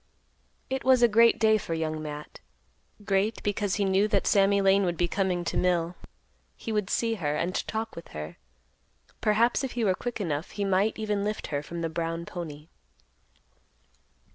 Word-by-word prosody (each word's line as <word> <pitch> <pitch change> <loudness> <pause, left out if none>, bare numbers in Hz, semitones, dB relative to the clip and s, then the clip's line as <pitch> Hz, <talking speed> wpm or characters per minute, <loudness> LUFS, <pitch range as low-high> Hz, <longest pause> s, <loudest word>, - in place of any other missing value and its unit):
It 265 0 -3
was 255 -1 +5
a - - +8
great 230 +1 +5
day 220 -1 +4
for 165 -4 -3
Young 155 -1 -2
Matt; 150 -1 -7 0.7
great 200 +2 0
because 205 -1 0
he 200 - +1
knew 195 +2 +3
that 200 -2 +1
Sammy 200 0 +4
Lane 195 0 +4
would 175 -2 -1
be 175 - +1
coming 185 -1 0
to - - -2
mill; 175 -1 +1 0.6
he 225 - -5
would 210 -3 -1
see 230 -1 +1
her 150 -1 0
and 175 +4 -1
talk 220 0 -3
with 170 - -9
her; 75 0 -7 0.8
perhaps 225 +4 +2
if 265 - -3
he 240 - -1
were 195 -3 +3
quick 240 +4 -5
enough, 160 -4 -2
he 200 -1 -2
might 195 +3 +2
even 210 -2 -1
lift 210 +1 -2
her 145 - 0
from 170 +3 -6
the 165 - 0
brown 165 +1 -3
pony. 155 -5 -7
195 Hz, 180 wpm, -27 LUFS, 170-215 Hz, 0.8 s, a